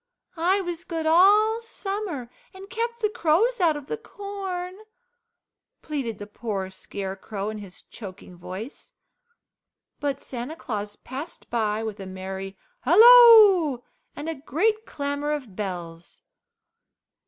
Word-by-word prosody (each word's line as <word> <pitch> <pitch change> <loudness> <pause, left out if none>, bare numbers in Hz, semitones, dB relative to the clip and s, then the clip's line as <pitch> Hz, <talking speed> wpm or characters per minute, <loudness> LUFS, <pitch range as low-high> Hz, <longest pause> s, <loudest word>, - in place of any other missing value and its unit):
I 365 +4 +2
was 345 -2 -5
good 325 -2 -4
all 415 +7 +5
summer 390 - -5 0.2
and 385 +1 -11
kept 470 0 -3
the 425 - +2
crows 425 +4 +2
out 325 -4 +3
of 290 - -9
the 450 - -4
corn," 390 -4 -6 1.1
pleaded 270 -9 -3
the 205 - -7
poor 205 -3 -4
Scarecrow 195 +2 -5
in 215 - -7
his 195 -3 -12
choking 185 -3 -11
voice, 190 - -9 1.1
but 280 -2 -2
Santa 250 +4 -6
Claus 210 -8 -5
passed 270 +9 -9
by 220 -2 0
with 220 -2 -5
a 195 - -7
merry 190 +1 -6 0.2
halloo 415 - +8 0.3
and 295 +2 -6
a 325 - -1
great 390 - -1
clamour 285 +1 -2
of 255 -10 -6
bells. 175 -4 -6
290 Hz, 125 wpm, -25 LUFS, -, 1.1 s, halloo